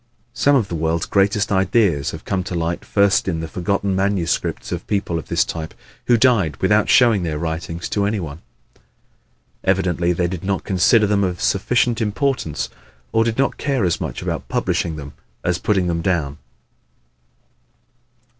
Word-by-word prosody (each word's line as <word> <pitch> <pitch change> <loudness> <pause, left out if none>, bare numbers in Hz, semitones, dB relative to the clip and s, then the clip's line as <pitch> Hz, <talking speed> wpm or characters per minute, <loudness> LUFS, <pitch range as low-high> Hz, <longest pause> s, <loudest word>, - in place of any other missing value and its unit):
Some 145 0 +3
of 120 -7 +2
the 90 - -7
world's 80 0 0
greatest 100 +1 +1
ideas 95 -6 +2
have - - -8
come 95 -1 -1
to 90 - -4
light 85 0 -2
first 100 -2 +2
in 85 -4 -1
the 80 - -4
forgotten 95 +3 -1
manuscripts 95 -3 -1
of - - -4
people 100 -5 -1
of - - -10
this - - +2
type 80 -1 -6 0.3
who 120 - +5
died 110 - +3
without 105 +3 +2
showing 115 -5 +5
their 80 -3 -2
writings 80 +1 -4
to 100 -1 0
any 105 0 -1
one. 80 -3 -7 1.2
Evidently 90 -2 +1
they 90 0 0
did 85 -1 -4
not 95 0 -1
consider 105 +3 +3
them 100 -1 +2
of 90 -2 -2
sufficient 120 +4 +1
importance 110 - -1 0.4
or 115 - +3
did 115 -1 -1
not 135 +1 0
care 135 -8 0
as 85 - 0
much - - -4
about - - -4
publishing 80 - -1
them 70 -1 -8 0.3
as 90 -1 +1
about - - -18
putting 95 -4 +2
them 85 -1 -1
down. 80 -5 -1
95 Hz, 170 wpm, -20 LUFS, 85-105 Hz, 1.2 s, who